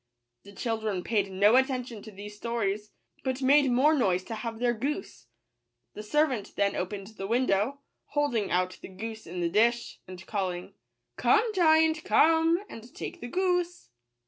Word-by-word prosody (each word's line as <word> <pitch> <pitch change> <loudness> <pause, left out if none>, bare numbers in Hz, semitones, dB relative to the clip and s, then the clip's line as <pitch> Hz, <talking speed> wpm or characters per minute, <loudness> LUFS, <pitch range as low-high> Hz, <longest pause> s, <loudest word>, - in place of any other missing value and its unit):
The 200 - -14
children 220 -5 -2
paid 205 -4 0
no 205 +4 +4
attention 250 -4 -1
to 220 - -10
these 205 +1 -9
sto 230 +3 -4
ries, 210 -1 -1 0.3
but 260 0 -2
made 280 +1 +5
more 265 +6 +4
noise 185 - +1
to 225 - -7
have 225 +1 -5
their 240 +1 +1
goose. 285 - -4 0.7
The - - -7
servant 260 -1 0
then 200 0 +1
opened 195 +2 -4
the 195 - -3
window, 240 +3 +1 0.2
hold 290 -2 0
ing 215 -4 0
out 185 +1 0
the - - -8
goose 220 +3 -8
in 175 +2 -5
the 170 - +1
dish, 235 +5 +1
and 185 0 -10
calling 185 -4 -3 0.2
" - - -53
Come, 440 0 +3
giant, 320 -3 +4
come, 325 +1 +4
and 230 - -11
take - - -7
the 240 - -5
goose." 355 - -1
230 Hz, 170 wpm, -28 LUFS, 200-280 Hz, 0.7 s, made